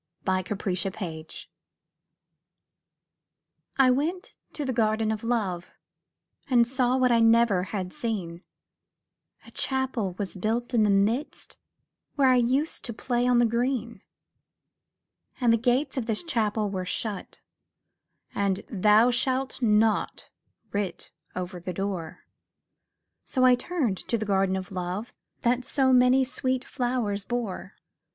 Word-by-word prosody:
THE 185 0 +1
GARDEN 190 0 -2
OF 190 - -5
LOVE 160 -4 -7 2.3
I 265 -2 +6
went 335 - -2 0.2
to 295 - -3
the 260 - -1
Garden 220 -1 +1
of 215 0 -4
Love, 200 -7 -2 0.8
And 240 -3 +5
saw 255 +1 +1
what 255 -1 +3
I 235 - +4
never 225 -5 +4
had 185 -2 -4
seen; 200 - -4 1.0
A - - -14
Chapel 260 -8 -2
was 200 -2 -4
built 230 +6 -2
in 235 - +4
the 210 - +3
midst, 210 +9 0 0.6
Where 275 -2 +4
I 255 - +5
used 260 +6 +1
to 235 - -4
play 245 +2 -1
on 250 -1 +4
the 240 - +5
green. 235 -2 -1 1.4
And 240 -3 +4
the - - +4
gates 250 +6 0
of 240 -3 -2
this 220 +4 -1
Chapel 220 -9 0
were 185 -2 -3
shut, 200 +2 -4 0.9
And 200 -1 0
'Thou 215 +3 +5
shalt 260 +2 -1
not' 220 -1 +1 0.4
writ 200 -3 -3 0.2
over 180 0 -5
the 180 +1 -5
door; 190 -3 -4 1.0
So 255 -1 +1
I 255 - +7
turned 250 - -1
to 235 - +1
the 215 - -3
Garden 195 -2 +1
of 190 0 -5
Love 185 +4 -4 0.3
That 245 +1 +1
so 260 0 +2
many 250 +1 +5
sweet 260 0 -2
flowers 240 -6 -1
bore. 235 -4 -4
230 Hz, 135 wpm, -26 LUFS, 195-250 Hz, 2.3 s, I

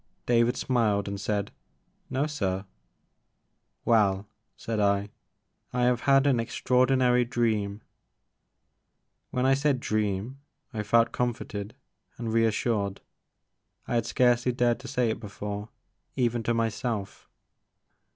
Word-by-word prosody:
David 120 +1 +3
smiled 110 -6 +1
and 100 0 -4
said, 100 0 -1 0.6
No 135 +3 0
sir." 100 -10 -2 1.2
Well," 100 -3 +3 0.3
said 115 -2 -3
I, 100 0 +2 0.3
" - - -45
I 125 0 +1
have 125 -1 +3
had 135 0 +6
an 135 -4 +3
extraordinary 125 +1 +2
dream." 110 -4 -1 1.5
When 125 0 0
I 135 - +5
said 140 -1 +2
dream," 110 +3 -2 0.3
I 110 - -2
felt 115 +2 +3
comforted 110 -4 -3 0.4
and 115 -2 -3
reassured. 110 -3 +1 0.9
I - - -3
had 115 -1 +1
scarcely 120 0 +3
dared 120 -1 +2
to 135 - -9
say 125 -4 +1
it - - -4
before, 105 0 -6 0.5
even 120 -2 +1
to 120 - +2
myself. 115 -2 -3
115 Hz, 120 wpm, -27 LUFS, 105-125 Hz, 1.5 s, had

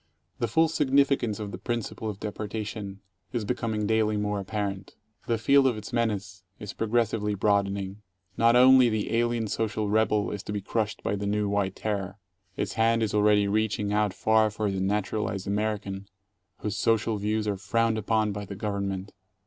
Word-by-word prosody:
The 120 - 0
full 160 +9 +3
significance 140 -7 +2
of 105 -2 -5
the 90 - -7
principle 115 0 -3
of 100 -2 -6
deportation 105 -1 -5 0.3
is 115 -4 -1
becoming 110 -2 -1
daily 110 0 +2
more 105 0 -1
apparent. 100 -1 -4 0.3
The 115 - +1
field 135 +4 +4
of 120 -4 0
its 110 +3 -8
menace 105 -5 -1 0.2
is 105 - -7
progressively 110 -2 0
broadening. 100 0 0 0.3
Not 115 +1 +4
only 130 0 +7
the 110 0 -1
alien 120 -1 +1
social 110 -1 -1
rebel 105 -1 +2
is 105 - -4
to 105 - -7
be 105 - -2
crushed 105 +2 -2
by 100 - 0
the 100 0 -3
new 105 0 0
White 100 -1 0
Terror. 100 -2 -3 0.4
Its 100 -1 -2
hand 115 0 +2
is 110 - -1
already 105 -1 +4
reaching 105 0 0
out 105 -1 +2
far 110 +2 +3
for 105 -1 -2
the 95 -1 -2
naturalized 100 0 -1
American 100 -1 -2 0.5
whose 105 -1 -2
social 115 0 +1
views 105 +1 -1
are 105 - 0
frowned 110 +3 +1
upon 110 0 +1
by 100 0 -5
the 100 +1 -7
Government. 100 -1 -3
105 Hz, 175 wpm, -27 LUFS, 100-115 Hz, 0.5 s, only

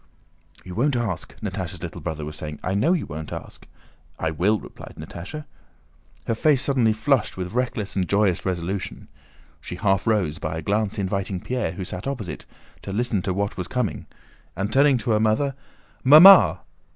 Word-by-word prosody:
"You 90 - -7
won't 130 +7 +1
ask," 110 -8 -3
Natásha's - - -5
little - - -6
brother 75 -2 -4
was 75 0 -7
saying; 75 -1 -6
"I 95 - -1
know 135 - +3
you 175 - -1
won't 80 0 -7
ask!" - - -9 0.5
"I - - -1
will," 100 +7 +1
replied - - -12
Natásha. 90 - -8 0.8
Her - - 0
face 145 +2 +3
suddenly 125 -5 +2
flushed 110 +1 0
with 90 -1 -4
reckless 120 -4 -2
and 90 -4 -1
joyous 100 -2 +2
resolution. 95 +1 -4 0.5
She - - -6
half 95 +1 +1
rose, 95 -9 +1
by 80 0 -3
a 80 - -5
glance 105 +3 0
inviting 95 -1 -2
Pierre, 125 -2 -2
who 95 0 -5
sat 90 +6 -6
opposite, 110 - -5 0.3
to - - -7
listen 110 -1 0
to 95 - -2
what 100 +1 -2
was 90 - -3
coming, 125 -5 -2 0.5
and 100 +4 -2
turning 140 0 +5
to 120 0 -2
her 105 - +3
mother: 110 +6 +1 0.5
"Mamma!" 160 +9 +9
100 Hz, 175 wpm, -23 LUFS, 90-125 Hz, 0.8 s, Mamma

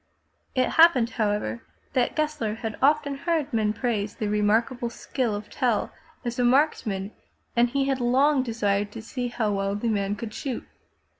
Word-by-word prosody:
It 255 -1 +3
happened, 265 -9 +6
however, 205 - -1 0.3
that 250 - +1
Gessler 300 -8 -1
had 225 -1 -4
often 285 +1 +3
heard 310 -2 -1
men 215 -2 +2
praise 215 -2 -2
the 215 - -2
remarkable 225 +4 +1
skill 235 -2 -2
of 205 +1 -6
Tell 240 -4 0 0.3
as 240 +1 -3
a - - +3
marksman 240 -7 +2 0.4
and 240 0 +4
he 275 +2 0
had 270 -2 0
long 265 +4 +3
desired 205 -4 0
to 225 - -7
see 245 +2 -3
how 230 -3 -1
well 195 0 -1
the 230 +3 -1
man 200 -1 0
could 215 +1 -6
shoot. 260 0 -4
235 Hz, 165 wpm, -26 LUFS, 210-265 Hz, 0.4 s, happened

